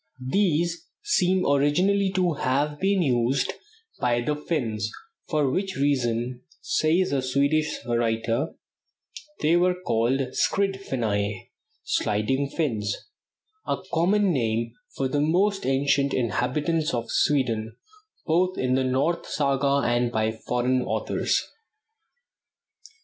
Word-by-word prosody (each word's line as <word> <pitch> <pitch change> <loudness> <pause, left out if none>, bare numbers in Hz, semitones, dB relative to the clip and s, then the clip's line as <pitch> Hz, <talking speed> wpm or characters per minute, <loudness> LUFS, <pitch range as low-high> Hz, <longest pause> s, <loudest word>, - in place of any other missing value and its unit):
These 170 -3 +1 0.2
seem 185 - +2
originally 180 +8 +2
to 180 -3 +2
have 145 +2 -1
been 195 -1 +2
used 125 -1 +1 0.5
by 120 -1 +1
the 150 +5 -1
Finns, 115 - -2 0.4
"for 150 -3 +1
which 190 +4 -2
reason," 125 -3 0 0.2
says 165 +4 +1
a 140 -2 +1
Swedish 140 +4 +1
writer, 115 +3 0 0.9
"they 160 +3 +3
were 180 +1 +3
called 130 -5 0
'Skrid 195 -1 +1
Finnai' 105 - -2 0.3
(Sliding 130 +7 0
Finns) 110 -11 -1 0.7
a - - 0 0.2
common 190 +3 +3
name 115 -3 -1 0.2
for 135 - 0
the 145 +2 0
most 190 +4 +1
ancient 140 +1 +2
inhabitants 140 - 0
of 115 -1 -4
Sweden, 115 -6 +1 0.5
both 180 +3 +1
in 130 0 0
the 130 0 +2
North 135 +7 0
saga 140 -1 +1
and 120 0 +1
by 110 -1 0
foreign 125 +3 0
authors." - - -1
140 Hz, 110 wpm, -25 LUFS, 120-165 Hz, 0.9 s, they